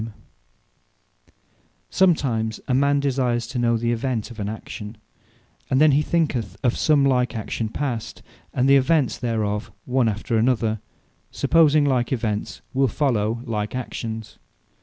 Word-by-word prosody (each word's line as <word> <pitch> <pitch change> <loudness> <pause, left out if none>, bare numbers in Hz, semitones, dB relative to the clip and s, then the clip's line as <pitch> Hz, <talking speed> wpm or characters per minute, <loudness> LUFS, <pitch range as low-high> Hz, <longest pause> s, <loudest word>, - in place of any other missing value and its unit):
Prudence 110 -2 -8 1.7
Sometime 135 -12 +2 0.2
a 130 - 0
man 140 +2 +3
desires 125 -4 0
to 125 +1 -4
know 120 -1 +2
the 120 +1 0
event 120 -1 -2
of 115 - -10
an 100 0 -2
action; 110 0 -7 0.7
and 130 - +2
then 155 0 +6
he 140 +2 +3
thinketh 130 - -1
of 120 - +2
some 145 -3 +3
like 125 -2 +1
action 110 0 -3
past, 120 -3 -4 0.3
and 130 +1 +1
the 140 0 +7
events 140 0 +2
thereof 110 -3 -2
one 125 -2 +2
after 110 +2 -2
another; 115 -2 +1 0.5
supposing 155 -3 +3
like 125 -4 +1
events 110 -5 -2
will 135 0 +3
follow 115 -4 0
like 105 -1 -3
actions. 115 -3 -5
120 Hz, 140 wpm, -23 LUFS, 110-135 Hz, 1.7 s, the